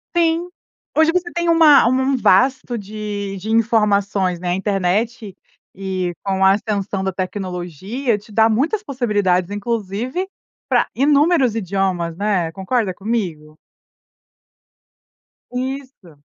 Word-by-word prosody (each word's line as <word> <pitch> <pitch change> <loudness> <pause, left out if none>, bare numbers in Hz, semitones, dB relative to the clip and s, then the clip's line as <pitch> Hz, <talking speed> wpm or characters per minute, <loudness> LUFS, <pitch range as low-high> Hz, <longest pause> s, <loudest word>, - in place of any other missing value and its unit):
Sim, 335 0 +2 0.5
hoje 320 +1 +4
você 350 -1 -1
tem 345 0 0
uma 310 -7 +6
um 255 +2 +2
um - - +1
vasto 250 +3 +2
de 205 -1 -5
de 210 +4 -7
informações 205 -5 +2
na 175 -1 -1
internet 200 +3 -1 0.4
e 185 -2 -3
com 190 -1 +1
a 190 - +7
ascensão 200 -2 -2
da 190 - -1
tecnologia 185 - -3
te 210 +1 -18
dá 220 +1 +4
muitas 300 - 0
possibilidades, 205 - 0
inclusive 230 - -3 0.4
pra - - +3
inúmeros 285 -2 +3
idiomas, 185 -4 -1
né? 190 -4 0
Concorda 195 +1 -1
comigo? 175 -8 -4 1.9
Isso. 255 - -6
210 Hz, 115 wpm, -19 LUFS, 190-255 Hz, 1.9 s, a